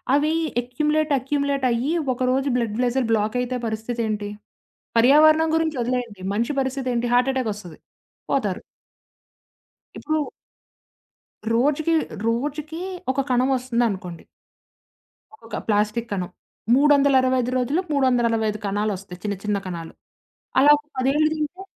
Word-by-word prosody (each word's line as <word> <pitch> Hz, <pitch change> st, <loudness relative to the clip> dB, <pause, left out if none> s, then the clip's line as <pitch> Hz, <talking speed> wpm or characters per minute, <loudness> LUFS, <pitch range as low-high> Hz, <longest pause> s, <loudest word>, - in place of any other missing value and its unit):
అవి 300 Hz, +2 st, +2 dB, 0.3 s
accumulate, 300 Hz, +5 st, 0 dB
accumulate 280 Hz, +1 st, -1 dB
అయ్యి, 245 Hz, +7 st, 0 dB, 0.2 s
ఒక 245 Hz, -, -12 dB
రోజు 270 Hz, +2 st, +1 dB
బ్లడ్ 225 Hz, -3 st, -2 dB
వెసెల్ 245 Hz, -1 st, 0 dB
బ్లాక్ 215 Hz, +1 st, +1 dB
అయితే 250 Hz, 0 st, -2 dB
పరిస్థితి 225 Hz, +2 st, -3 dB
ఏంటి? 210 Hz, -1 st, -3 dB, 0.7 s
పర్యావరణం 310 Hz, +6 st, +6 dB
గురించి 320 Hz, -3 st, 0 dB
వదిలేయండి. 240 Hz, -4 st, -3 dB
మనిషి 235 Hz, +7 st, 0 dB
పరిస్థితి 265 Hz, -1 st, -2 dB
ఏంటి? 240 Hz, 0 st, 0 dB
హార్ట్ 250 Hz, +2 st, +4 dB
అటాక్ 255 Hz, -4 st, -1 dB
వస్తది. 185 Hz, -5 st, -11 dB, 0.5 s
పోతారు. 205 Hz, -9 st, 0 dB, 1.4 s
ఇప్పుడు 310 Hz, 0 st, -1 dB, 1.3 s
రోజుకి 295 Hz, +7 st, +2 dB, 0.3 s
రోజుకి 295 Hz, +7 st, -2 dB, 0.3 s
ఒక 260 Hz, -, -8 dB
కణం 255 Hz, +1 st, +2 dB
వస్తుందనుకోండి. 235 Hz, -9 st, -2 dB, 1.1 s
ఒక్కొక్క -, -, -8 dB
ప్లాస్టిక్కు 215 Hz, +2 st, 0 dB
కనం. 180 Hz, -3 st, -3 dB, 0.5 s
365 265 Hz, -3 st, +4 dB
రోజులు 255 Hz, +6 st, 0 dB
365 235 Hz, -6 st, +1 dB
కణాలొస్తాయి 200 Hz, -2 st, -3 dB
చిన్న 205 Hz, -1 st, -2 dB
చిన్న 210 Hz, -1 st, 0 dB
కణాలు. 170 Hz, -2 st, -6 dB, 0.7 s
అలా 285 Hz, +2 st, +7 dB
ఒక 295 Hz, -, -14 dB
10ఏళ్లు 280 Hz, +4 st, +2 dB
తింటే 310 Hz, +4 st, -4 dB
250 Hz, 115 wpm, -23 LUFS, 220-285 Hz, 1.4 s, అలా